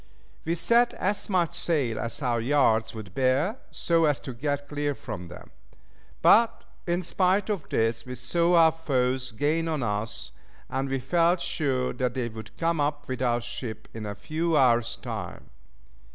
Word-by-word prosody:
We 165 +1 0
set 235 +8 +3
as 205 +3 -2
much 175 -4 +1
sail 150 -10 0
as 115 +5 -4
our 120 -2 +1
yards 115 -4 +2
would 105 -5 -8
bear, 135 - +1
so 165 -1 +2
as 145 -2 +2
to 130 - -6
get 145 +3 -2
clear 145 -1 -2
from 90 -7 -7
them. - - -12 0.7
But 230 +1 +5 0.2
in 175 +1 0
spite 190 +4 +1
of 190 -8 -4
this, 115 0 0
we 125 0 -7
saw 170 +8 +1
our 165 -1 +7
foes 130 -5 -1
gain 150 +8 0
on 155 -5 -1
us, 105 +1 -3 0.4
and 135 +1 -1
we 135 - 0
felt 170 +6 +2
sure 135 -7 -1
that 125 0 -1
they 125 -2 -1
would 110 -1 -10
come 165 -2 +1
up 145 0 -1
with 130 -1 -4
our 120 -1 +1
ship 115 -2 -6
in 110 -2 -6
a 100 - -5
few 155 +9 -1
hours' 120 -3 +3
time. 115 - -7
140 Hz, 170 wpm, -27 LUFS, 120-165 Hz, 0.7 s, our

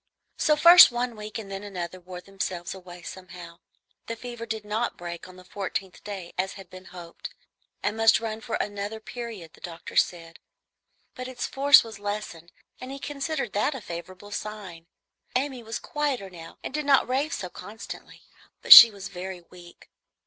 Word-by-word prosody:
So 305 - +3
first 340 0 +9
one 240 0 -2
week 215 0 -7
and 205 -3 -8
then 195 0 -5
another 185 -3 -6
wore 180 0 -10
themselves 185 -2 -5
away 180 -2 -12
somehow. 175 -1 -10 0.5
The 230 - -4
fever 240 0 -8
did 220 -1 -4
not 220 +3 -2
break 175 0 -7
on 185 - -14
the 185 - -14
fourteenth 190 -1 -5
day, 195 -4 -7
as 190 +1 -1
had 195 -3 -13
been 185 0 -12
hoped, 175 -2 -10 0.5
and 210 +2 -1
must 225 0 +5
run 220 -1 -5
for 230 - -4
another 205 +1 -4
period, 220 -7 -8
the - - -20
doctor 170 -1 -9
said; 165 -1 0 0.7
but 255 0 -7
its 255 -1 -4
force 280 +1 +6
was 220 -3 -10
lessened, 205 -5 -6 0.3
and 255 - -8
he 275 - -6
considered 275 -4 -4
that 215 +8 0
a - - -5
favorable 185 +3 -9
sign. 200 -6 -7 0.5
Amy 260 -1 -1
was 225 0 -5
quieter 275 -10 -3
now 165 -2 -12
and - - -6
did 300 -1 -3
not 275 -2 +4
rave 275 +5 0
so 185 - -4
constantly, 205 +5 -10 0.4
but - - +12
she 230 - +13
was 200 -2 -8
very 180 0 -7
weak. 175 -1 -15
205 Hz, 180 wpm, -26 LUFS, 180-235 Hz, 0.7 s, she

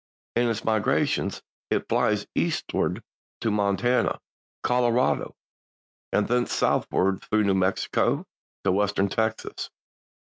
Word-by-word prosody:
In 120 0 +3
its 115 -1 -3
migrations 110 -2 +1 0.3
it - - 0
flies - - +1
eastward - - -1 0.4
to 110 - +1
Montana, 105 +5 +1 0.4
Colorado 125 0 +2 0.8
and 105 - +2
thence 125 +1 +1
southward 95 0 +1
through 110 0 +1
New 100 -1 +3
Mexico 95 0 +1 0.4
to - - +3
Western 100 0 +1
Texas. 110 +2 -2
110 Hz, 105 wpm, -26 LUFS, 100-120 Hz, 0.8 s, In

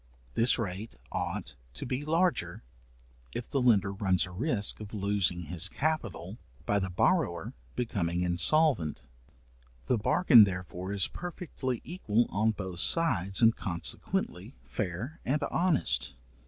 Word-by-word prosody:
This 115 +2 +4
rate 105 -1 -4 0.2
ought 70 - -3 0.2
to - - -5
be 130 +3 -2
larger, 165 - 0 0.7
if 120 - -4
the 135 - 0
lender 100 -6 +3
runs 95 -2 +1
a 90 - -10
risk 105 - -1
of 105 0 -8
losing 100 -3 +1
his 85 +3 0
capital 110 - -2 0.3
by 100 - +2
the 95 -1 -2
borrower 90 - +1 0.2
becoming 90 -7 -1
insolvent. 90 - +2 0.8
The 120 - +1
bargain 120 - +7
therefore 90 -1 -3
is 100 -2 +2
perfectly 155 -8 -5
equal 120 - 0
on 110 +3 +2
both 95 -5 -4
sides 100 - +2
and 115 0 +6
consequently, 90 +3 -3
fair 105 - -4
and 145 +3 0
honest. 175 -4 +1
105 Hz, 125 wpm, -30 LUFS, 90-130 Hz, 0.8 s, bargain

